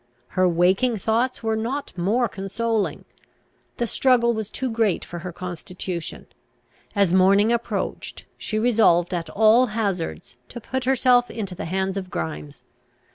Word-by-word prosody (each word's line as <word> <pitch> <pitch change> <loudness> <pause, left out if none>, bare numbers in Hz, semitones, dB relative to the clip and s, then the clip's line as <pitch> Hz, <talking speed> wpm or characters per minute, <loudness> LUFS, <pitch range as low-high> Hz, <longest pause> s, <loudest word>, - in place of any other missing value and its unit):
Her 185 -1 +2
waking 185 +8 +2
thoughts 230 +5 0
were 220 0 0
not 240 +4 -3
more 210 +8 +1
consoling. 210 +2 -2 0.7
The 240 - 0
struggle 235 0 +3
was 220 -2 -4
too 260 - -3
great 225 -5 0
for 175 - -7
her 180 +1 -6
constitution. 180 0 -6 0.7
As 200 -4 +3
morning 195 +4 +5
approached, 235 0 -4
she 215 - -3
resolved, 215 -7 +3
at 165 -2 -3
all 220 +7 +5
hazards, 170 - -3
to 240 - -7
put 260 +2 -4
herself 250 -1 +3
into 205 -5 -5
the - - -6
hands 190 +3 -1
of 185 -2 -5
Grimes. 75 - -6
205 Hz, 140 wpm, -23 LUFS, 180-235 Hz, 0.7 s, morning